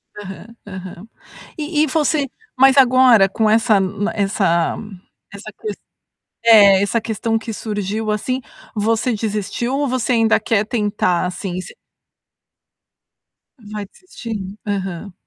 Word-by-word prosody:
Aham, 205 +3 -10
aham. 185 +1 -9 0.5
E 305 0 0
e 310 - +1
você 295 0 +1 0.3
mas 265 0 +6
agora 255 -6 +6
com 215 +2 +1
essa 220 -1 +4
n 200 +3 -2
essa 195 -5 0 0.6
essa 215 +2 -9
ques 210 -2 -5 0.7
é, 200 -3 +7
essa 220 +3 0
questão 225 0 -1
que 225 0 -6
surgiu, 210 0 -3
assim, 255 +5 -1 0.3
você 225 +3 0
desistiu 215 +4 -2
ou 290 - 0
você 255 0 0
ainda 225 -1 +3
quer 215 -1 +1
tentar 205 -6 0
assim, 180 0 -5
e - - -4
s - - -8 1.9
Vai 210 -1 -7
desistir? 215 - -8
Aham. 195 -2 -4
215 Hz, 125 wpm, -19 LUFS, 200-235 Hz, 1.9 s, é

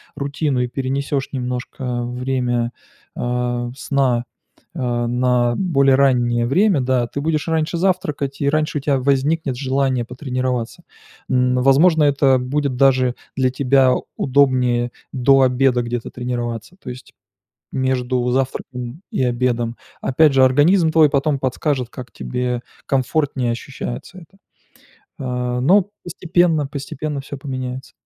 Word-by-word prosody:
рутину 140 -1 -1
и 125 - 0
перенесешь 135 +2 -2
немножко 125 -1 -3
время, 125 -1 -1 0.4
а, 120 0 -2
сна, 135 -3 0 0.5
а, 120 -5 -1
на 120 -1 +1
более 140 -8 +3
раннее 120 -3 +2
время. 185 - +3
Да, 125 -2 +1
ты 140 - -5
будешь 155 0 -1
раньше 160 +1 0
завтракать 165 -7 -1
и 140 - +1
раньше 155 0 0
у - - -10
тебя 140 -2 +1
возникнет 140 +1 0
желание 130 -2 0
потренироваться. 125 -2 -3 0.5
Н, 125 0 +2
возможно, 155 +5 +5
это 140 -2 +4
будет, 140 +1 -1
даже, 130 -2 +3 0.2
для 130 -2 +2
тебя 130 -1 +3 0.2
удобнее 125 -3 +2 0.2
до 135 +1 +4
обеда 125 -1 +3
где-то 120 0 -4
тренироваться, 120 +3 -4
то 125 - -6
есть 125 +1 -12 0.6
между 130 -1 0
завтраком 130 +2 -3
и 130 - 0
обедом. 120 -1 0 0.3
Опять 150 +2 +4
же, 130 -1 +6
организм 160 +6 +4
твой 155 -3 +5
потом 140 0 +1
подскажет, 130 0 -1
как 125 -5 -9
тебе 125 -1 -3 0.3
комфортнее 135 -1 0
ощущается 130 +7 -7
это. 180 +3 -16 0.8
А, 125 -1 -2
ну 190 +7 +3
постепенно, 175 -3 +1
постепенно 140 +1 -5
всё 140 +1 -8
поменяется. 130 -1 -5
130 Hz, 125 wpm, -20 LUFS, 125-140 Hz, 0.8 s, же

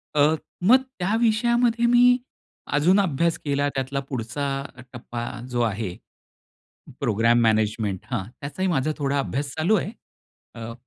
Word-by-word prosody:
अ, 150 +2 +4 0.3
मग 255 +7 +6 0.2
त्या 190 +5 0
विषयामध्ये 235 +1 +2
मी 245 +1 +6 0.6
अजून 175 +7 +4
अभ्यास 170 -2 +1
केला 145 0 +1
त्यातला 135 +1 -2
पुढचा 120 +2 -3 0.5
टप्पा 120 -1 -6 0.3
जो 120 -1 0
आहे, 105 -5 -2 1.1
प्रोग्रॅम 115 -2 +3
मॅनेजमेंट 110 -3 +1
हां, 110 -7 -1 0.2
त्याचाही 185 +7 -3
माझा 155 -2 +1
थोडा 140 -1 0
अभ्यास 140 +1 -2
चालू 175 +8 +3
आहे. 200 - -2 0.6
अ, 115 -1 -7
140 Hz, 125 wpm, -24 LUFS, 120-190 Hz, 1.1 s, मग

